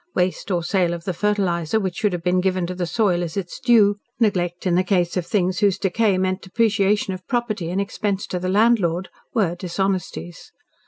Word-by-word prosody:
Waste 180 +2 0
or 175 -3 0
sale 175 -1 +1
of 170 - -9
the 185 - -2
fertiliser 190 -2 0
which 190 -4 -3
should 210 - +1
have 175 -2 -4
been 180 +1 +2
given 185 -1 0
to 180 - -4
the 180 -1 -3
soil 190 -4 +1
as 170 +1 -4
its 180 -3 -4
due, 210 -4 +4 0.2
neglect 180 -5 0
in 180 - +2
the 180 +2 +3
case 180 -3 +1
of 180 -3 -2
things 185 -2 0
whose 200 -3 +3
decay 200 0 +1
meant 185 0 0
depreciation 205 -1 +1
of 185 0 -9
property 225 -8 -1
and 185 +3 -1
expense 200 0 -2
to 180 - -3
the 185 +1 -2
landlord, 190 -4 +2 0.3
were 195 -7 +2
dishonesties. 175 - -3
185 Hz, 200 wpm, -22 LUFS, 175-205 Hz, 0.3 s, due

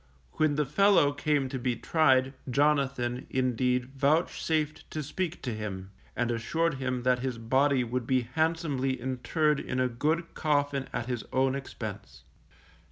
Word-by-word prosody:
When 155 - +1
the 150 0 +1
fellow 165 0 +4
came 145 -1 0
to 130 -1 -4
be 125 0 0
tried 130 -1 +3 0.2
Jonathan, 135 -3 +1
indeed, 125 -1 +1
vouchsafed 155 +2 0
to 155 - -4
speak 175 +4 -4
to 120 - -2
him, 100 -3 -6 0.2
and 120 0 0
assured 145 +6 -1
him 130 -2 -2
that 125 0 +3
his 125 -2 -3
body 130 +2 +2
should 125 0 -3
be 130 -1 +3
handsomely 140 -1 -1
interred 140 +4 0
in 125 - -3
a 130 - +3
good 155 +8 -1
coffin 145 -3 0
at 120 -1 -3
his 120 -3 -3
own 130 0 +2
expense. 135 -1 -7
135 Hz, 150 wpm, -29 LUFS, 125-150 Hz, 0.2 s, fellow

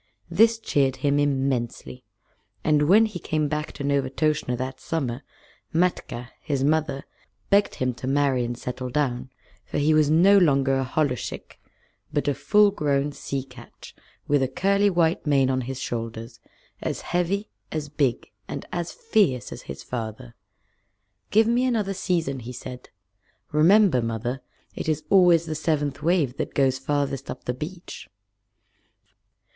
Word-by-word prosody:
This 225 0 +5
cheered 140 - +1
him 145 0 +3
immensely; 130 - -1 0.6
and 150 -1 +3
when 215 +4 +7
he 210 -5 -5
came 155 -2 -1
back 150 +1 -3
to 140 - -7
Novastoshnah 140 -1 0
that 130 +1 -5
summer, 135 -6 -3 0.5
Matkah, 160 -8 -1
his 140 -4 -2
mother, 150 -2 +1 0.5
begged 200 +1 +3
him 130 -1 -1
to 125 +2 -7
marry 135 -2 +2
and 120 0 -4
settle 125 +1 -5
down, 130 -3 -1 0.3
for - - -5
he 150 +2 +3
was 155 -1 +4
no 190 +6 +6
longer 135 -5 +3
a - - 0
holluschick 130 -2 -3 0.5
but 145 - -1
a 145 - +3
full 200 +10 +4
grown 145 -5 0
sea 140 -1 -4
catch, 125 -3 -14 0.3
with 145 -1 +3
a 130 - +2
curly 200 +8 +2
white 170 -3 +1
mane 135 -2 +3
on 130 0 0
his 130 +1 -5
shoulders, 115 -1 -5 0.4
as - - -3
heavy, 190 +4 -1 0.2
as 155 -2 -3
big, 140 -4 -1 0.2
and - - -6
as 175 -1 -3
fierce 200 - +1
as - - -7
his 70 - -7
father. 110 - -6 1.0
"Give 220 +2 +4
me 240 +2 +2
another 220 -6 0
season," 165 -8 -1
he 125 +1 -8
said. 125 +1 -9 0.6
"Remember, 170 - +5
Mother, 115 +3 -3 0.3
it - - -4
is 155 -1 -1
always 175 -4 +6
the 160 - -3
seventh 150 -3 -1
wave 160 -7 +1
that - - -4
goes 135 -1 +2
farthest 140 -1 -2
up 130 - -6
the 125 - -2
beach." 170 +7 -8
145 Hz, 150 wpm, -25 LUFS, 130-170 Hz, 1.0 s, when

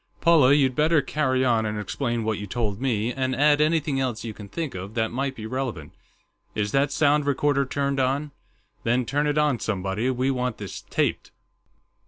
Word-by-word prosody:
"Paula, 160 -6 +5
you'd 135 -3 +3
better 155 +1 +3
carry 130 -4 0
on 115 -3 +2
and 105 -1 -2
explain 120 +3 -2
what 110 -1 -1
you 105 - -6
told 105 0 -2
me, 120 -3 0
and 130 -1 -1
add 145 +1 +4
anything 155 -3 +1
else 125 -4 -2
you 115 -2 -5
can 105 -1 -11
think 155 +6 -4
of 95 +3 -7
that 110 -1 0
might 135 +2 -2
be 110 - -7
relevant.... 115 - -4 0.6
Is 105 -1 -1
that 140 +1 +2
sound 145 0 +2
recorder 140 -1 +1
turned 140 0 -1
on? 140 +3 0 0.5
Then 120 +2 +1
turn 145 +5 0
it 145 0 0
on, 150 -5 +2
somebody; 100 +3 -1
we 130 +1 0
want 125 -2 -2
this 100 -3 -7
taped." - - -1
130 Hz, 190 wpm, -25 LUFS, 110-145 Hz, 0.6 s, Paula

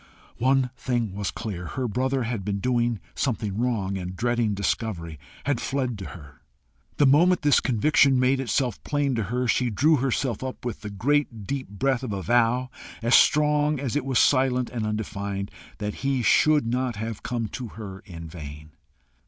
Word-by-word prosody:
One 130 0 +2
thing 120 -6 -2
was 100 -1 -2
clear 90 -7 -5
her 130 +8 -3
brother 130 +3 0
had 115 -4 -3
been 100 +1 -2
doing 120 -1 +1
something 110 -6 -2
wrong, 105 -5 -1
and 90 0 -5
dreading 120 -1 0
discovery, 95 -6 -2 0.2
had 140 -4 0
fled 130 -5 -2
to 95 - -6
her. 75 -6 -11 0.6
The 145 - +5
moment 165 +6 +4
this 145 -1 +5
conviction 135 +2 +3
made 130 +1 +3
itself 125 -2 -1
plain 145 -2 0
to 115 -4 -1
her, 125 +5 -1
she 125 +2 +2
drew 150 +9 +3
herself 130 -2 -1
up 130 -1 -6
with 120 - -4
the 105 - -6
great 115 0 0
deep 135 +2 -4
breath 125 +5 0
of 125 -6 -4
a 95 -1 -4
vow, 120 +2 +2 0.3
as 120 +2 +2
strong 150 -1 +4
as 135 -1 -3
it 145 - +1
was 135 -2 0
silent 130 -2 +3
and 115 -3 -2
undefined, 100 -2 -3 0.3
that 105 0 -3
he 135 -2 0
should 150 +2 +4
not 125 +1 -1
have 110 +1 -5
come 120 -3 -2
to 125 +2 -6
her 100 -3 -8
in 85 -4 -10
vain. 75 -2 -9
120 Hz, 175 wpm, -25 LUFS, 105-130 Hz, 0.6 s, The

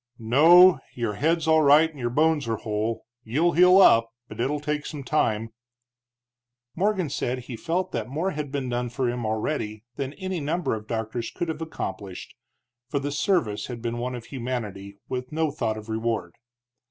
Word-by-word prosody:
"No, 160 +9 +6 0.2
your 115 -3 -2
head's 160 +7 0
all 160 0 +5
right 150 +2 +6
and 155 -3 -14
your 120 -1 -1
bones 150 +1 +2
are 115 - 0
whole. 110 +1 -3 0.2
You'll 155 +10 +1
heal 180 +2 +6
up, 115 -11 +6 0.2
but - - -11
it'll 145 +4 0
take 150 0 -3
some 145 -2 -6
time." 115 -5 0 1.2
Morgan 190 -1 +1
said 125 -2 -2
he 125 0 -8
felt 175 +7 -2
that 115 -1 -3
more 165 +8 -1
had 150 -3 -5
been 140 -2 -2
done 120 0 -2
for 125 +1 -1
him 120 -2 -2
already 110 -1 -2
than 140 0 -3
any 190 -1 -4
number 160 +4 -1
of 110 -1 -6
doctors 115 +1 -3
could 175 - -4
have 160 0 -4
accomplished, 100 - -6 0.6
for 140 - -1
the 140 +1 -2
service 140 - 0
had 125 -2 -6
been 120 0 -3
one 125 +1 -3
of 120 -2 -8
humanity, 115 -7 -5
with 125 0 -4
no 155 -1 0
thought 115 -6 -2
of 110 0 -9
reward. 110 -6 -2
130 Hz, 180 wpm, -25 LUFS, 115-160 Hz, 1.2 s, No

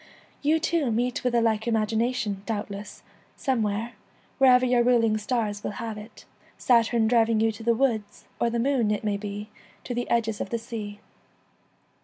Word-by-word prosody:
You 310 +3 +3
too 325 -4 0
meet 240 +2 -1
with 250 -1 +1
a 235 - +4
like 220 -1 +1
imagination, 220 -1 0
doubtless, 205 -2 -5 0.3
some 260 -4 0
where, 215 +3 -2 0.5
wherever 255 -1 +6
your 245 -1 +3
ruling 230 -3 +3
stars 210 -2 -2
will - - -3
have 225 -2 -4
it, 210 +2 -12 0.3
Saturn 230 -2 +3
driving 230 -1 +3
you 225 0 +3
to 215 - -11
the 230 +1 +2
woods, 225 -5 -1
or 235 - +2
the 235 - -2
Moon, 245 -2 +1
it 210 +1 -1
may 205 -1 0
be, 205 +1 -6 0.3
to 245 - -4
the 245 0 -3
edges 225 -2 0
of - - -4
the 235 - -1
sea. 215 -3 -7
230 Hz, 175 wpm, -26 LUFS, 215-245 Hz, 0.5 s, wherever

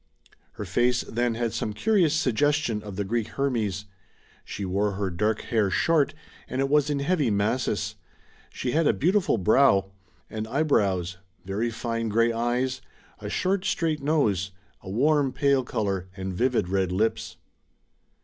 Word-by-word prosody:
Her - - -6
face 125 0 +2
then 120 0 -1
had 115 -1 -2
some 105 - -2
curious 180 - +2
suggestion 145 -4 +1
of 105 -2 -8
the 100 - -1
Greek 115 +2 -1
Hermes. 115 -7 -2 0.6
She 100 - -5
wore 100 +2 0
her 95 -1 -2
dark 105 +5 0
hair 110 -4 +1
short, 145 - +2 0.3
and 130 - -4
it 135 0 +1
was 150 0 +3
in 145 -1 -1
heavy 150 -4 +1
masses. 105 +5 -1 0.5
She 125 - -3
had 160 +2 +2
a - - +4
beautiful 180 - +2
brow 110 +8 +5
[vii] 95 - +2
DORA 95 0 -22 0.4
SIGERSON - - -8
and 110 0 -3
eyebrows, 100 - +1 0.3
very 105 +5 -1
fine 115 0 -3
grey 115 +2 +2
eyes, 125 +3 -1 0.4
a - - -6
short 185 0 0
straight 155 -3 0
nose, 110 - +1 0.3
a 95 - -10
warm 140 +5 +2
pale 140 -1 +2
colour, 100 -6 -2
and 95 0 -4
vivid 120 -1 +1
red 95 -1 0
lips. 110 +5 -1
115 Hz, 160 wpm, -26 LUFS, 100-140 Hz, 0.6 s, brow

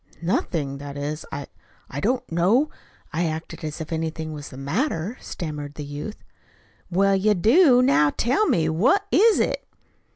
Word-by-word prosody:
"Nothing. 150 -5 -1
That 140 0 -7
is, 150 +2 -4
I 140 0 -4 0.4
I 140 - -5
did 205 - +1
not 255 -7 -2
know 200 - +3 0.4
I 170 +2 +1
acted 160 +2 -6
as 155 +1 -4
if 160 +1 -5
anything 160 0 -3
was 145 -1 -7
the 130 - -11
matter," 170 - -1
stammered 150 -3 -6
the 150 - -6
youth. 145 +9 -7 0.7
"Well, 195 +2 +3
you 210 +2 +3
do. 250 - +5
Now, 150 - +4
tell 265 - +1
me, 160 -3 +2
what 250 - +3
is 440 +3 +5
it?" - - 0
165 Hz, 165 wpm, -24 LUFS, 150-225 Hz, 0.7 s, do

